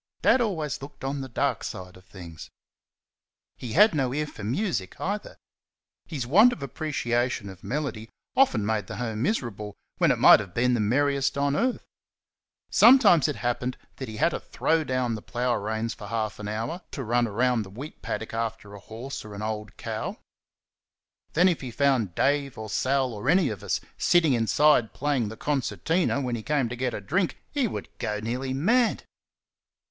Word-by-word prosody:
Dad 260 - +5
always 160 - -2
looked 140 0 -11
on 135 +1 -2
the 135 - -6
dark 115 - -1
side 90 0 -7
of 95 0 -17
things. 85 -4 -11 1.1
He 120 -3 -7
had 210 +5 +6
no 135 -5 0
ear 150 +1 0
for 110 - -10
music 125 - -2
either. 205 +2 -4 0.7
His 140 -7 -4
want 205 - +6
of 160 - -6
appreciation 125 -6 -1
of 95 -2 -12
melody 125 -6 -3 0.3
often 195 - +3
made 105 -2 -1
the - - -6
home 115 -3 -3
miserable 110 - -2 0.2
when - - +4
it - - +3
might - - +8
have 100 -5 -8
been 125 +1 +2
the 120 - +1
merriest 140 +6 +1
on 140 0 +1
earth. 250 +6 0 0.9
Sometimes 225 - +7
it 150 - -2
happened 125 +1 -2 0.2
that 130 - -5
he 110 - -7
had 165 - +3
to - - -4
throw 160 0 0
down 130 -4 -1
the 110 - -5
plough 125 +2 -1
reins 110 +1 -2
for - - -10
half 110 -2 -3
an 105 - -5
hour 110 +3 -2
or 170 - -4
so - - -35
to 135 - -4
run 120 +1 +1
round 120 +2 +1
the 95 - -11
wheat 130 +10 -9
paddock 110 +2 -4
after 115 -2 -4
a 100 - -9
horse 115 +7 -7
or 105 -1 -9
an 105 - -6
old 105 -1 -5
cow; - - -4 1.2
then, 175 +4 +5
if 175 -4 +1
he 130 - -5
found 120 -7 +1
Dave, 140 -2 +1
or 110 -1 -6
Sal, 130 +1 +1
or 110 +5 -3
any 175 -3 +4
of 105 -4 -6
us, - - -1 0.2
sitting 165 -5 +4
inside 120 +2 +3
playing 135 -6 0
the 110 - -9
concertina 145 - 0
when 125 -3 -2
he 115 - -5
came 140 -1 0
to 120 - -4
get 125 0 -2
a - - -5
drink, 180 - 0
he 280 -5 +1
would - - -5 0.4
nearly 125 +4 -2
go - - -3
mad. 230 - +2
125 Hz, 190 wpm, -26 LUFS, 110-150 Hz, 1.2 s, might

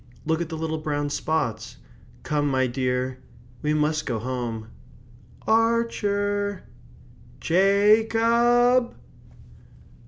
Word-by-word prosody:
Look 160 +1 0
at 170 - -4
the 160 - -5
little 160 0 -3
brown 145 -1 -2
spots. 155 - -2 0.5
Come, 145 -1 0
my 130 -1 +1
dear. 130 0 -2 0.4
We 150 0 0
must 155 0 0
go 120 -4 -1
home. 115 -2 -4 0.8
Ar 230 +1 +3
cher! 205 -1 -2 0.8
Ja 200 +5 +4
cob!" 240 +2 +3
160 Hz, 100 wpm, -24 LUFS, 135-210 Hz, 0.8 s, Ja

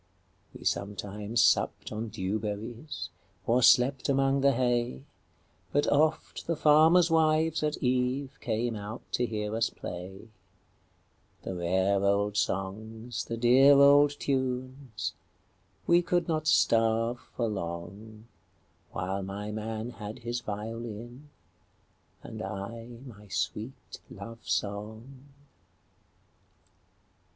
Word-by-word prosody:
We - - -13
sometimes 105 +3 -1
supped - - +2
on 110 +2 -3
dew 105 -1 -2
berries, 105 - -5 0.4
Or 120 +2 +3
slept 125 +2 +4
among 135 0 +2
the 140 0 +4
hay, 120 - 0 0.7
But 145 - +2
oft 155 +2 +1
the 170 - +1
farmers' 160 +3 +5
wives 160 0 +3
at 150 0 0
eveCame 125 -2 -1
out 105 +3 -7
to 125 - 0
hear 105 -1 -3
us 115 0 +1
play; 95 +5 -8 1.1
The - - -4
rare 95 +3 +1
old 100 +1 +2
songs, 110 +4 -3
the 115 - -4
dear 130 +4 +6
old 145 +1 +6
tunes,—We 130 +5 -2
could 175 -1 0
not 155 -2 -1
starve 115 0 +3 0.2
for 120 - 0
longWhile 100 +1 -7
my 100 +2 -5
man 110 +2 -4
had 105 -1 -8
his 120 +1 -2
violin, 115 +5 -7 0.9
And 110 -2 -7
I 100 +4 -6 0.2
my 105 -5 -12
sweet 110 +5 -4
love 115 0 -10
song. 110 +6 -4
115 Hz, 105 wpm, -29 LUFS, 105-135 Hz, 1.1 s, dear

